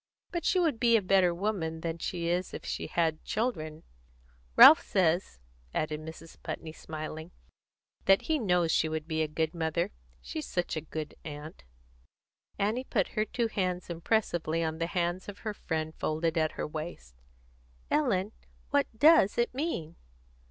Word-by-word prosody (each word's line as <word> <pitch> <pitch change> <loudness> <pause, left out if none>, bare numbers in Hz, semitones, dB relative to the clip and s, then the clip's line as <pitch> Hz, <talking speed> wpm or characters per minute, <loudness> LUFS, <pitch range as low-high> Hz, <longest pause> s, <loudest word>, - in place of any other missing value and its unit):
But 345 -2 -3
she 370 - +3
would 320 -9 +1
be 235 -2 +5
a - - 0
better 185 -1 +4
woman 170 -4 -2
than 165 0 -3
she 170 0 -3
is 175 +1 -1
if - - -8
she - - -3
had 160 -2 0
children. 160 -9 -2 0.7
Ralph - - +10
says," 175 - +1 0.4
added 155 0 -1
Mrs. 160 +1 -11
Putney, 160 - -5
smiling, 155 +1 -7 0.8
"that 195 0 +5
he 315 -1 +1
knows 180 -7 +2
she 160 - +2
would 155 0 -3
be 160 -1 -1
a 155 - +1
good 160 +1 -1
mother, 165 0 -1 0.3
she's 60 - -6
such 175 -1 -2
a 155 - -2
good 155 -1 -6
aunt." 150 +1 -8 0.9
Annie 220 +6 0
put - - 0
her 215 -1 0
two 235 +1 -1
hands 180 -4 -2
impressively 170 -3 0
on 160 0 -2
the 165 - 0
hands 175 +1 -1
of 200 - -8
her 215 - -1
friend 160 -4 -3
folded 160 +1 -1
at 155 -1 +1
her - - -3
waist. 155 - -7 0.8
"Ellen, 210 -9 +2 0.4
what 285 0 +3
does 300 -6 +6
it 235 +1 +1
mean?" 250 - -3
170 Hz, 160 wpm, -30 LUFS, 160-205 Hz, 0.9 s, Ralph